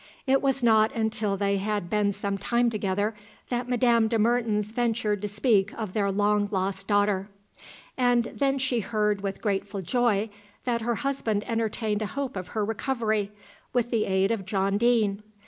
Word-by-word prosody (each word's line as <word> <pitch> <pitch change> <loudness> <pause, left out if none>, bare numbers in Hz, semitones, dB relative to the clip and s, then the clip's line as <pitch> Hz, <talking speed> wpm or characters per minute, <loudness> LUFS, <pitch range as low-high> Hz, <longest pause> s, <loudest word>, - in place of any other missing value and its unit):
It 270 0 +3
was 270 -2 0
not 220 -2 +5
until 220 -3 -1
they 200 0 +1
had 205 -2 -2
been 205 +2 +1
some 200 0 -3
time 235 +4 +1
together 205 0 -1 0.4
that 245 0 -2
Madame 235 -2 +3
de 225 0 +1
Mertens 220 -2 +1
ventured 225 -3 0
to 210 - -2
speak 205 -1 +2
of 215 -5 -4
their 200 -2 +1
long 205 +1 +2
lost 195 -1 -2
daughter; 205 -1 +1 0.7
and 245 -2 +3
then 275 +3 -1
she 255 -2 0
heard 210 -2 0
with 195 -1 -4
grateful 200 -1 -2
joy 220 -1 +1 0.3
that 235 -2 0
her 235 +1 0
husband 235 -6 -1
entertained 220 -2 -1
a 215 - -1
hope 275 +1 -4
of 185 -2 -5
her 210 - +1
recovery, 220 -2 -1 0.4
with 240 -1 0
the 230 -3 +1
aid 190 +2 +2
of 225 -4 -1
John 195 +1 0
Deane. 220 -4 +2
215 Hz, 170 wpm, -26 LUFS, 200-235 Hz, 0.7 s, not